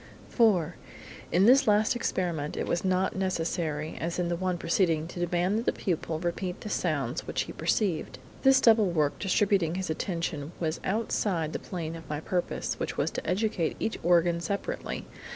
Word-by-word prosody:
"IV: 205 - +4 0.6
In 185 +3 +4
this 265 +4 +6
last 215 +3 +4
experiment 170 -10 -2
it - - -1
was 170 - -1
not 185 0 +1
necessary, 165 -4 -2
as 170 +1 -2
in 175 -1 0
the 175 - 0
one 185 0 -1
preceding, 165 -2 +1
to 175 - -8
demand 175 +4 +1
that 230 - -4
the - - +3
pupil 165 -3 -1
repeat 175 +1 -3
the 210 - -6
sounds 145 -5 -1
which - - -1
he - - -8
perceived. 190 - 0 0.2
This 270 0 +6
double 220 -5 +5
work, 155 -4 0
distributing 190 -3 +2
his 185 -3 -2
attention, 165 -2 -3
was 160 -1 -1
outside 190 -6 0
the - - -2
plane 165 -3 -5
of 165 -1 -10
my 150 -1 -2
purpose, 175 +2 -2
which - - -3
was - - 0
to - - -4
educate 185 -3 0
each 220 - -2
organ 170 0 +3
separately. 200 +4 -3
175 Hz, 175 wpm, -28 LUFS, 165-195 Hz, 0.6 s, this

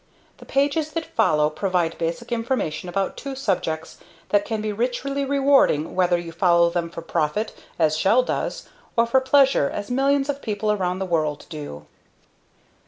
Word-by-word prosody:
The - - -14
pages 290 +3 0
that 330 -1 -2
follow 150 -9 +2
provide 170 0 0
basic 165 +7 -3
information 230 - -2
about 195 +2 -2
two 275 -1 -6
subjects 170 -10 -2 0.3
that 205 -1 +2
can 220 -1 -2
be 215 0 -2
richly 255 +5 -1
rewarding 275 - +3
whether 180 -1 +2
you 170 -1 -6
follow 170 0 +3
them 170 -1 -2
for 165 0 -8
profit, 170 +7 -1 0.2
as 155 -2 +2
Shell 210 +10 +4
does, - - -3 0.3
or 230 - +5
for 260 +3 +3
pleasure, 265 - +4
as 205 +3 -5
millions 275 +2 +2
of 285 -1 -3
people 210 -1 -1
around 185 -3 -1
the 190 - -2
world 155 -4 -1
do. 145 - -7
200 Hz, 165 wpm, -23 LUFS, 165-265 Hz, 0.3 s, or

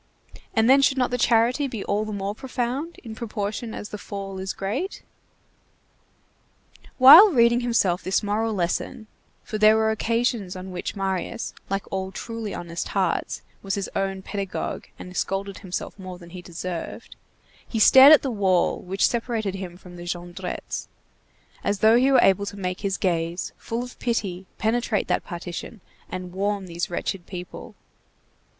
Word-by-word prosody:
And 225 -1 +4
then 270 +2 +7
should 275 0 +3
not 250 -1 +1
the 245 - 0
charity 240 +5 +3
be 230 -6 -5
all 210 +1 0
the 215 - -5
more 200 0 -3
profound, 260 +6 -3
in 225 -3 -7
proportion 220 0 -4
as 210 - -7
the 210 - -7
fall 195 -2 -6
is 190 0 -3
great? 215 - -4 1.9
While 300 +11 +11
reading 235 -6 +4
himself 215 -7 +1
this 190 +4 0
moral 215 +2 0
lesson, 180 +4 -2 0.4
for 215 - -4
there 215 +1 +7
were 220 0 +2
occasions 230 -3 0
on 185 0 -7
which 180 +3 -4
Marius, 195 +3 -3 0.2
like 195 0 -2
all 190 0 -3
truly 225 +1 -5
honest 170 -2 -5
hearts, - - -1 0.2
was 195 +1 -2
his 200 -1 -4
own 195 -1 -2
pedagogue 195 -2 -4
and 180 0 -10
scolded 195 +1 -2
himself 185 +1 -5
more 185 -1 -7
than 170 -1 -14
he 180 0 -8
deserved, 175 -1 -6 0.5
he 230 - -4
stared 265 +6 +9
at 310 - +8
the 270 - -1
wall 190 -5 +2
which 190 +2 +1
separated 230 -4 -2
him 185 -2 -7
from 180 -1 -13
the 175 - -8
Jondrettes, 175 +1 -5 0.8
as 200 0 0
though 220 +1 +6
he 260 +3 +4
were 265 - +6
able 200 +1 +3
to 200 - -6
make 180 -2 -3
his 195 -2 -1
gaze, 170 -1 -1
full 230 +2 -4
of 245 - -11
pity, 195 -6 -2
penetrate 225 0 0
that - - +1
partition 175 +4 -7 0.3
and 180 -1 -6
warm 200 +1 -1
these 170 0 -3
wretched 175 +1 -3
people. 180 -1 -8
200 Hz, 165 wpm, -24 LUFS, 185-230 Hz, 1.9 s, While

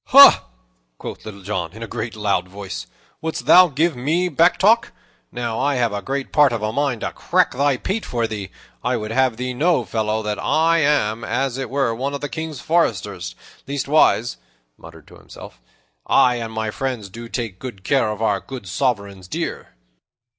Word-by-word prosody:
"Ha!" - - +8 0.5
quoth - - -8
Little 100 -2 -9
John 90 -4 -3
in 110 +2 -8
a - - -6
great 115 0 -5
loud 100 -4 0
voice, 100 +1 -7 0.3
"wouldst 160 0 -4
thou 185 0 +8
give 155 +1 0
me 160 +9 0
backtalk? 190 - +4 0.4
Now 120 -2 -3
I 140 +2 +1
have 120 -4 +1
a 100 - -3
great 135 +3 -4
part 145 -3 +5
of 115 -3 -3
a 110 0 -1
mind 140 -4 0
to - - -2
crack - - +1
thy 140 0 +1
pate 205 - -3
for 120 -2 -1
thee. 105 -4 -5 0.3
I 125 0 +1
would 110 -1 -5
have 130 -1 +2
thee 125 +1 -3
know, 150 -1 +2
fellow, 110 +2 -1
that 105 0 -3
I 165 +2 +3
am, 120 -7 +1
as 135 0 -1
it 135 - -4
were, 135 -4 0
one 135 +5 -3
of 140 - -6
the 145 - -3
King's 160 -4 -5
foresters. 100 - 0 0.3
Leastwise," 140 -3 +2 0.4
muttered - - -14
he - - -16
to - - -14
himself, - - -13 0.5
"I 125 -1 +4
and 115 -1 -5
my 110 -1 -2
friends 125 -4 -3
do 115 +4 -9
take 115 -7 -4
good 120 -8 -8
care 135 0 +2
of 105 +1 -4
our 100 -3 +2
good 125 -2 -9
sovereign's 100 -3 -2
deer." 75 - -5
120 Hz, 190 wpm, -21 LUFS, 105-140 Hz, 0.5 s, Ha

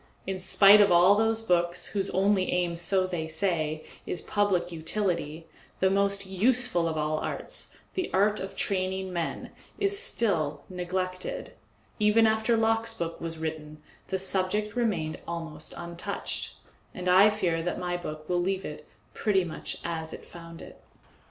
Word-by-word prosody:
In 190 0 -3
spite 200 +2 +7
of 200 -2 +4
all 175 +3 +7
those 225 +1 +1
books, 175 -3 +1
whose 200 -1 -1
only 195 0 +2
aim, 175 -1 0
so 185 +3 +2
they 175 -3 -3
say, 160 -2 -1 0.2
is 175 - -2
public 190 -4 0
utility, 165 -2 -2 0.3
the 190 0 +3
most 200 0 +1
useful 195 -2 +1
of 160 -1 -2
all 155 0 0
arts, - - -5 0.2
the 370 -2 -2
art 205 +2 +2
of 195 0 -6
training 190 -1 -1
men, 170 -2 -3 0.3
is 400 0 +4
still 155 - +2
neglected. 185 - -4 0.5
Even 210 +2 +5
after 220 +1 +2
Locke's 225 0 +1
book 170 -4 -4
was 165 -1 -4
written 155 -1 -5 0.3
the 190 - -1
subject 195 +3 0
remained 185 -10 -1
almost 160 -2 -5
untouched, 170 0 -5 0.4
and 180 0 -5
I 190 +3 +7
fear 180 -6 0
that 175 +1 -2
my 180 -1 -2
book 155 -3 -6
will 175 -1 +1
leave 190 +1 -1
it 150 0 -8 0.2
pretty 195 -3 +1
much 165 -2 -5
as 160 -1 -4
it - - -9
found 165 -1 -11
it. - - -13
185 Hz, 155 wpm, -28 LUFS, 165-205 Hz, 0.5 s, spite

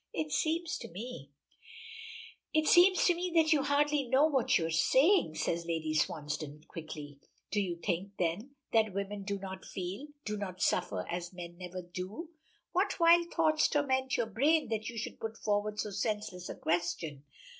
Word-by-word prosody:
It 155 -1 -2
seems 325 - 0
to - - -7
me 185 - -8 0.6
" 450 0 -13
"It 310 0 +4
seems 360 +1 +6
to 355 - +5
me 355 +1 -3
that 320 -1 +5
you 295 - +3
hardly 290 +1 +2
know 265 +4 +5
what 275 -6 +3
you 165 - -1
are 165 - -2
saying," 260 - +4
said 170 - 0
Lady 160 -2 -1
Swansdown 150 -1 -2
quickly. 150 -3 -8 0.3
"Do 205 - +2
you 180 -3 -2
think 185 +3 -3
then 195 +11 -2 0.2
that 220 -4 +3
women 200 +1 -3
do 200 0 -3
not 190 -1 -7
feel, 190 +9 -5 0.2
do 210 0 -2
not 185 -3 -5
suffer 90 -2 0
as 175 +1 -4
men 175 -1 -8
never 180 0 -6
do? 185 - -6 0.4
What 370 +2 0
wild 340 0 +5
thoughts 310 -2 +3
torment 265 -2 +1
your 235 - +1
brain 285 +8 +2
that 220 -1 -2
you 235 - -8
should 225 - -5
put 225 0 -5
forward 210 0 -1
so 210 - -2
senseless 200 -2 -3
a - - -5
question? 160 -4 -2
205 Hz, 175 wpm, -32 LUFS, 175-290 Hz, 0.6 s, seems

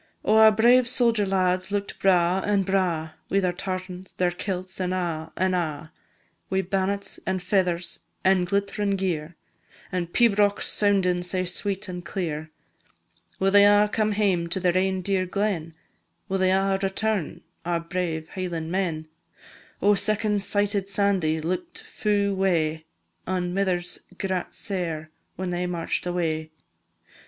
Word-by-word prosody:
Oh, 215 - +4
our 220 0 +8
brave 240 +3 +5
sodger 235 -5 +2
lads 185 -1 +1
look'd 200 0 -3
braw, 180 -1 +3
an' 200 -1 +1
braw, 180 -5 0 0.2
Wi' 195 - +2
their 180 -2 0
tartans, 185 0 -5
their 180 -1 +1
kilts, 185 +1 -4
an' 180 0 -1
a', 165 -3 -3
an' 185 0 +1
a', 155 -3 -2 0.6
Wi' 190 0 +1
bannets 195 +1 -2
an' 190 - +1
feathers, 180 -2 0 0.2
an' 190 -1 +4
glittrin' 200 +2 0
gear, 170 -3 -2 0.6
An' 180 -2 -1
pibrochs 205 0 +3
soundin' 190 -4 +2
sae 185 +1 -1
sweet 195 +2 -3
an' 180 -1 -5
clear. 160 -4 -4 0.9
Will 195 0 +2
they 200 0 +7
a' 205 +1 +6
come 215 0 +1
hame 190 -5 +1
to 180 - -1
their 180 -1 +1
ain 190 0 +1
dear 190 -1 0
glen? 180 -5 -2 0.5
Will 195 -1 -1
they 185 0 +3
a' 195 0 +2
return, 195 -2 -1 0.2
our 170 0 0
brave 165 -2 -3
Hieland 170 -3 -4
men? 170 -4 -1 0.8
Oh, 205 +1 +6
second 210 0 +1
sighted 200 0 0
Sandie 190 -6 +1
look'd 185 - -3
fu' 210 - 0
wae, 160 -5 0 0.4
An' 180 -1 -1
mithers 180 -2 0 0.2
grat 190 -2 -3
sair 165 -5 -3 0.2
whan 185 0 -3
they 180 0 -1
march'd 175 0 -2
away. 160 -3 -1
185 Hz, 145 wpm, -25 LUFS, 175-200 Hz, 0.9 s, our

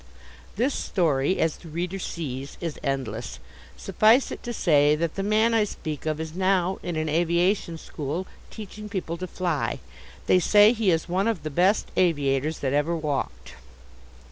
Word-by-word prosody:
This 260 +4 +1
story, 160 -2 +1
as 160 -1 +1
the 170 - -13
reader 175 +4 -3
sees, 140 -6 -5
is 165 -3 -5
endless. 135 -3 -3 0.4
Suffice 215 +7 +3
it - - -6
to 240 - -5
say 150 -8 +3
that 165 +1 -2
the 195 - -3
man 215 +3 +2
I 225 -1 +4
speak 155 -7 -5
of 155 0 -1
is 160 -1 -5
now 185 0 +1
in 175 -2 -4
an 155 0 -1
aviation 170 +2 +1
school 155 +3 -5 0.2
teaching 210 0 -9
people 180 -4 -4
to 185 +2 -5
fly. 175 -5 -2 0.5
They 185 - +4
say 210 +4 +6
he 220 -4 +1
is 165 -1 +1
one 185 +4 0
of 210 -10 -1
the 155 - -4
best 185 +8 +2
aviators 145 -3 +1
that 135 - 0
ever 150 +4 +1
walked. 150 -4 -3
170 Hz, 170 wpm, -25 LUFS, 155-195 Hz, 0.5 s, say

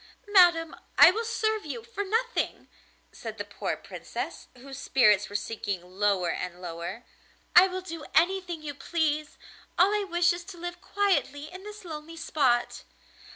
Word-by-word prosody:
'Madam, 350 -5 +5 0.2
I - - +10
will 455 - -2
serve 440 -1 -1
you 310 +10 -6
for 455 -3 -4
nothing,' 460 +5 -1 0.4
said - - -8
the - - -4
poor - - -3
Princess, - - -7
whose 270 +2 -10
spirits 210 -8 +4
were 205 - -10
sinking 205 -4 -3 0.2
lower 195 -4 +2
and 180 -1 -5
lower. 175 +5 -6 0.5
'I 360 +2 +9
will 370 0 -4
do 335 -4 -7
anything 350 -1 +2
you 290 -1 -4
please; 305 +1 -1 0.4
all 385 +4 +5
I 420 -1 +1
wish 345 0 +3
is 345 0 -6
to 370 -1 -10
live 350 +1 -6
quietly 305 -7 0
in 370 +1 -9
this 420 -1 -10
lonely 320 0 -8
spot. 260 -7 +1
330 Hz, 155 wpm, -28 LUFS, 260-380 Hz, 0.5 s, I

